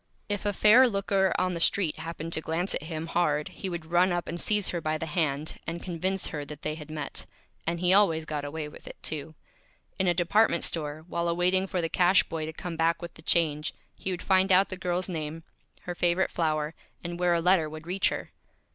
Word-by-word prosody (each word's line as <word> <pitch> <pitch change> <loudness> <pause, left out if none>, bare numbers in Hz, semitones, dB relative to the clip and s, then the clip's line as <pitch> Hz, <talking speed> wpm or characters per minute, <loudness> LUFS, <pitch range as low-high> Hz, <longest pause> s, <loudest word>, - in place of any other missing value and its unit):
If 205 0 -2
a - - +3
Fair 220 +6 +6
Looker 195 -3 +1
on 185 0 +1
the 170 - -3
Street 170 -1 +3
happened 165 +1 -6
to 160 - +2
glance 165 +4 -1
at - - -1
him 160 -1 -4
Hard 150 -3 0
he 190 - -6
would 170 -2 -5
run 175 +3 +3
up 175 -1 -1
and 170 +1 -4
seize 210 -2 +1
her 170 - -2
by 155 0 -1
the 165 - -4
Hand, 155 -2 -1
and 170 +1 -4
convince 185 +2 -2
her 150 -3 -4
that 150 +1 -10
they 155 - -1
had 155 -1 -9
Met. 155 -1 -5 0.4
And 170 0 0
he 180 +1 +3
always 165 -6 +4
Got 150 -2 -3
Away 150 +1 -4
with 150 - -13
it, - - -8
too. 155 0 -4 0.6
In 190 - +2
a 175 - +3
Department 175 +2 +3
Store, 155 -1 -1
while 170 -1 -1
awaiting 180 +3 +2
for 185 -2 -1
the - - +1
Cash 180 +3 +4
Boy 155 -1 -4
to - - -4
come 170 +1 -5
back 165 +1 +2
with 170 -1 -8
the - - -14
Change, 155 -2 +1 0.2
he - - -5
would 180 -1 -3
find 190 0 +3
out 190 +2 +5
the 185 - -3
Girl's 180 0 -1
Name, 160 -2 -4 0.4
her 180 - -5
Favorite 175 +1 +1
Flower, 155 -2 0 0.3
and 175 0 -5
where 175 -1 +3
a - - +2
Letter 170 -2 +3
would 155 +1 -9
reach 185 +2 +1
her. - - -5
170 Hz, 225 wpm, -28 LUFS, 155-185 Hz, 0.6 s, Fair